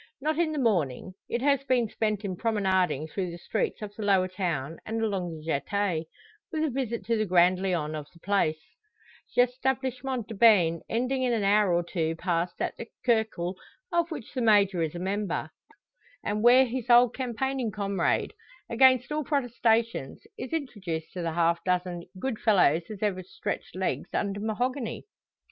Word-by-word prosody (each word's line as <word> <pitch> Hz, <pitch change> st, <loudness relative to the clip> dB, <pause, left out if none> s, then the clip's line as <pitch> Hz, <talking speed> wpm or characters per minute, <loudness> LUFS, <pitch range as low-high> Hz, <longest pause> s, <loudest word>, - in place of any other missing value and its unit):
Not 310 Hz, +3 st, -1 dB
in 335 Hz, -2 st, +2 dB
the 305 Hz, -, -3 dB
morning. 185 Hz, -, 0 dB, 0.2 s
It 240 Hz, +2 st, -1 dB
has 280 Hz, -1 st, +3 dB
been 250 Hz, -4 st, +2 dB
spent 215 Hz, -1 st, -2 dB
in 190 Hz, -2 st, -2 dB
promenading 190 Hz, -, +1 dB
through 185 Hz, +2 st, -3 dB
the 170 Hz, -, -7 dB
streets 215 Hz, +4 st, -2 dB
of 205 Hz, -1 st, -6 dB
the 220 Hz, -, -7 dB
lower 195 Hz, -3 st, +3 dB
town 165 Hz, -6 st, -3 dB
and 225 Hz, +1 st, -3 dB
along 190 Hz, -7 st, -2 dB
the 155 Hz, -, -12 dB
jetee, 165 Hz, +2 st, -1 dB, 0.4 s
with 315 Hz, -1 st, -1 dB
a 310 Hz, -, 0 dB
visit 235 Hz, -5 st, -3 dB
to 230 Hz, +2 st, +1 dB
the 215 Hz, -1 st, 0 dB
grand 180 Hz, +1 st, +4 dB
lion 170 Hz, -5 st, -1 dB
of 150 Hz, -2 st, -5 dB
the 170 Hz, -, -19 dB
place, 185 Hz, -5 st, +1 dB, 0.8 s
l'Establissement 255 Hz, 0 st, 0 dB
de 225 Hz, -, -6 dB
Bains, 195 Hz, -7 st, +5 dB
ending 255 Hz, +3 st, 0 dB
in 250 Hz, -2 st, +1 dB
an 220 Hz, -3 st, 0 dB
hour 200 Hz, -1 st, +4 dB
or 175 Hz, 0 st, +2 dB
two 165 Hz, -2 st, -2 dB
passed 170 Hz, 0 st, -2 dB
at -, -, -2 dB
the 230 Hz, -, -7 dB, 0.2 s
"cercle" 220 Hz, -7 st, +1 dB, 0.4 s
of 340 Hz, -1 st, +1 dB
which 290 Hz, -9 st, -7 dB
the 255 Hz, -, -2 dB
Major 200 Hz, -5 st, +4 dB
is 160 Hz, 0 st, -2 dB
a -, -, -4 dB
member, 195 Hz, 0 st, -2 dB, 0.7 s
and 210 Hz, +1 st, -1 dB
where 250 Hz, +3 st, +7 dB
his 250 Hz, 0 st, -4 dB
old 240 Hz, 0 st, +6 dB
campaigning 260 Hz, 0 st, -2 dB
comrade, 200 Hz, -4 st, 0 dB, 0.4 s
against 255 Hz, +2 st, +5 dB
all 305 Hz, 0 st, -1 dB
protestations, 230 Hz, -, 0 dB
is 255 Hz, -, -7 dB
introduced 195 Hz, -, -4 dB
to 180 Hz, -, -4 dB
the 165 Hz, -1 st, -2 dB
half 170 Hz, 0 st, +1 dB
dozen 180 Hz, -1 st, -1 dB
"good 245 Hz, +1 st, -2 dB
fellows 180 Hz, -7 st, +4 dB
as 215 Hz, -1 st, -6 dB
ever 195 Hz, -3 st, 0 dB
stretched 305 Hz, -, -5 dB
legs -, -, -2 dB
under 200 Hz, 0 st, -1 dB
mahogany." 235 Hz, +3 st, -2 dB
210 Hz, 175 wpm, -28 LUFS, 180-245 Hz, 0.8 s, where